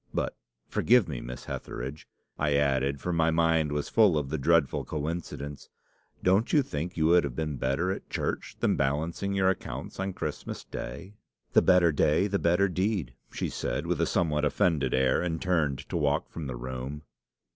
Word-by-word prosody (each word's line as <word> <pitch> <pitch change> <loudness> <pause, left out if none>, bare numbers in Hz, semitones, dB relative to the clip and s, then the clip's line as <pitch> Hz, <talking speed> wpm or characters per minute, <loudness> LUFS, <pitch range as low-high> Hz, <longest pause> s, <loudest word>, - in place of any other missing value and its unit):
'But, - - -1 0.3
forgive 120 -4 +4
me, 70 -6 -4
Miss 60 +1 -8
Hetheridge,' 70 +5 -6 0.3
I 75 -1 +2
added, 70 -1 +1
for 90 +5 -2
my 80 -1 +3
mind 80 -2 +2
was 75 0 -1
full 105 -8 +4
of 70 -3 -2
the 80 +1 -2
dreadful 80 0 +2
coincidence, 75 -2 -5 0.5
'don't 95 +5 +3
you 145 - +4
think 85 - -4
you 80 - +2
would 85 +2 +5
have 70 -4 -4
been 75 -2 -2
better 70 +9 0
at 95 - -6
church - - -3
than - - +3
balancing 80 +8 -1
your 95 -1 +3
accounts 95 - -6
on 95 0 -2
Christmas - - -5
Day?' 70 +11 -7 0.4
"'The - - +7
better 90 -2 +5
day 75 +4 +3
the 100 -1 0
better 90 +4 +3
deed,' 95 - -1 0.2
she - - -2
said, - - -3
with - - 0
a - - +2
somewhat 75 -4 +1
offended 75 -2 +2
air, 65 0 +3
and 85 -2 -2
turned 80 -7 0
to - - -4
walk - - 0
from 80 -4 -5
the 65 - -4
room. 65 +4 -6
80 Hz, 180 wpm, -28 LUFS, 70-90 Hz, 0.5 s, The